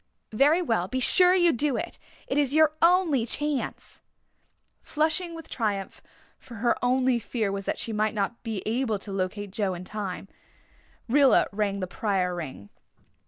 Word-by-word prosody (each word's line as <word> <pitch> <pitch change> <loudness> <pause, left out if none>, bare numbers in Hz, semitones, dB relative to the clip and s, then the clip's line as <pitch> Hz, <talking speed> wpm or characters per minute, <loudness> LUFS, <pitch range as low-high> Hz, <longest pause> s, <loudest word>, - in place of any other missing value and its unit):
Very 295 +10 +4
well, 225 - 0
be 260 - -2
sure 360 +7 +5
you 350 -2 +4
do 280 +1 0
it 345 - -6 0.3
it 275 - 0
is 285 0 +1
your 310 -1 +5
only 335 -7 +4
chance." 290 +3 -3 0.8
Flushed 315 +3 0
with 325 -1 -9
triumph 205 -5 -3 0.4
for 240 - -12
her 235 +2 +1
only 255 0 +2
fear 220 -2 -2
was 195 0 -4
that - - -2
she 225 - -5
might 215 +1 0
not 205 +3 -2
be 220 -5 -4
able 225 -1 0
to 200 +1 -8
locate 195 +1 -3
Joe 200 -2 -1
in 175 - -8
time 195 -1 -5 0.8
Rilla 275 +2 +5
rang 200 -1 -1
the - - -1
Pryor 185 -2 -1
ring. 135 - -7
230 Hz, 165 wpm, -26 LUFS, 200-290 Hz, 0.8 s, sure